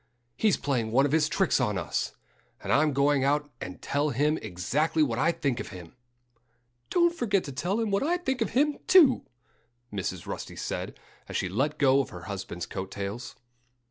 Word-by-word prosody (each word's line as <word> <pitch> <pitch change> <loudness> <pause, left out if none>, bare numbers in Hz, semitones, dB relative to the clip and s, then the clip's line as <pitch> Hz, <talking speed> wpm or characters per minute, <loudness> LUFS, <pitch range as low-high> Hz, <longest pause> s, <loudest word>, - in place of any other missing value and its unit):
"He's 205 - +2
playing 125 -6 -1
one 130 +5 +4
of 145 - 0
his 155 0 +3
tricks - - +2
on - - 0
us. - - -2 0.5
And - - -1
I'm 150 +2 +4
going 140 0 +2
out 145 +1 +1
and 90 - -6
tell 145 +2 0
him 150 +4 +1
exactly 140 - 0
what 120 -5 -1
I 165 +5 +3
think 140 -7 -1
of - - -5
him." 90 -2 -11 0.9
"Don't 345 -1 +3
forget 205 - +1
to 140 - -6
tell 175 - -1
him 225 -3 -1
what 200 - +2
I 340 +5 +1
think 265 -8 -2
of 225 - +1
him, 295 +1 +2
too!" 310 -9 +6 0.7
Mrs. 95 -3 -3
Rusty - - -6
said, - - -5 0.3
as - - -2
she - - -1
let 135 +11 -1
go 135 -1 +4
of 135 - -6
her - - -9
husband's 95 -4 -5
coat 95 -1 -5
tails. 100 +6 -5
145 Hz, 190 wpm, -28 LUFS, 115-190 Hz, 0.9 s, too